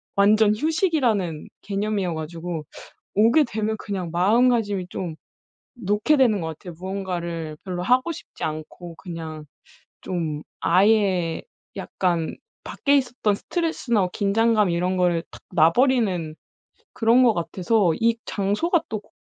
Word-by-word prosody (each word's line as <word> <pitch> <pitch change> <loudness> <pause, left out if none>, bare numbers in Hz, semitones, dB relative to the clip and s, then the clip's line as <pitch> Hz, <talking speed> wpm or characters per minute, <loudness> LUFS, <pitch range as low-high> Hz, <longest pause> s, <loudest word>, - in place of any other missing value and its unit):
완전 210 +1 +4
휴식이라는 255 - 0
개념이어 200 -3 -2
가지고 165 0 -5 0.5
오게 230 +9 +5
되면 220 -3 -2
그냥 185 -4 -4
마음가짐이 205 0 +2
좀 175 -2 -5 0.6
놓게 215 +6 +1
되는 235 -8 +3
것 160 - -3
같아요. 160 +3 -8
무언가를 175 -4 -4
별로 180 -2 -4
하고 255 - +2
싶지 330 - -9
않고 155 +2 -5
그냥 160 -3 -7 0.6
좀 160 -5 -3 0.2
아예 190 -3 +2 0.3
약간 170 -3 -1 0.3
밖에 285 0 +1
있었던 245 -6 0
스트레스나 320 - -1
뭐 180 - 0
긴장감 210 +1 +2
이런 180 +2 0
거를 175 -2 +2
탁 - - -13
놔 165 -1 +5
버리는 205 - +1 0.6
그런 230 +3 +4
것 240 -3 +5
같아서 175 +3 +1
'이 230 0 +2
장소가 215 - 0
또 215 - -3
고 - - -28
200 Hz, 275 characters per minute, -23 LUFS, 170-230 Hz, 0.6 s, 오게